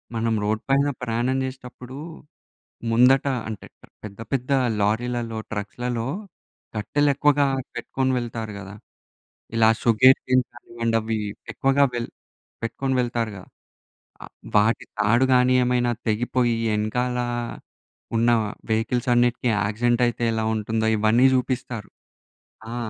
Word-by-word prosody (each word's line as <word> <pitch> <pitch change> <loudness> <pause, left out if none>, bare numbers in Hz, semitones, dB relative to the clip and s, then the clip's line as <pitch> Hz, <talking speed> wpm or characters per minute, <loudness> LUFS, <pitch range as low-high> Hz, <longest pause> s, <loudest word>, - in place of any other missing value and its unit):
మనం 115 0 0
రోడ్ 110 +1 0
పైన 140 +1 +3
ప్రయాణం 125 +2 0
చేసేటప్పుడు, 130 0 -9 0.9
ముందట 125 +4 +5 0.2
అంటే 105 -4 -7 0.4
పెద్ద, 100 0 -9
పెద్ద 135 0 -1 0.3
లారీలలో, 115 +2 -1
ట్రక్స్‌లలో 115 +3 -3 0.7
కట్టెలెక్కువగా 145 +5 +2 0.3
పెట్టుకొని 130 0 -1
వెళ్తారు 115 -3 -5
గదా, 100 +1 -9 0.8
ఇలా 110 -1 +5
షుగర్ 125 +3 +6
కేన్ 130 -1 +3
కానివ్వండి, 115 -1 -3
అవి 110 0 -2 0.3
ఎక్కువగా 135 +1 +3
వెల్ 120 -1 -3 0.5
పెట్టుకొని 130 +3 -2
వెళ్తారుగా. 115 -6 -3 0.8
ఆహ్, - - -12 0.2
వాటి 105 +2 +3
తాడు 115 +4 +3
కాని 125 0 +4
ఏమైనా 125 -1 +1 0.2
తెగిపోయి, 120 +2 +1 0.2
ఎనకాల 125 +4 -1 1.0
ఉన్న 115 +1 +3 0.4
వెహికల్స్ 120 +3 0
అన్నిటికి 120 0 +2
యాక్సిడెంట్ 115 +5 +1
అయితే 120 0 -5
ఎలా 110 0 -1
ఉంటుందో 110 +1 -1
ఇవన్నీ 110 +4 +4
చూపిస్తారు. 125 -4 -3 0.8
ఆ! - - -4
120 Hz, 105 wpm, -24 LUFS, 110-125 Hz, 1.0 s, షుగర్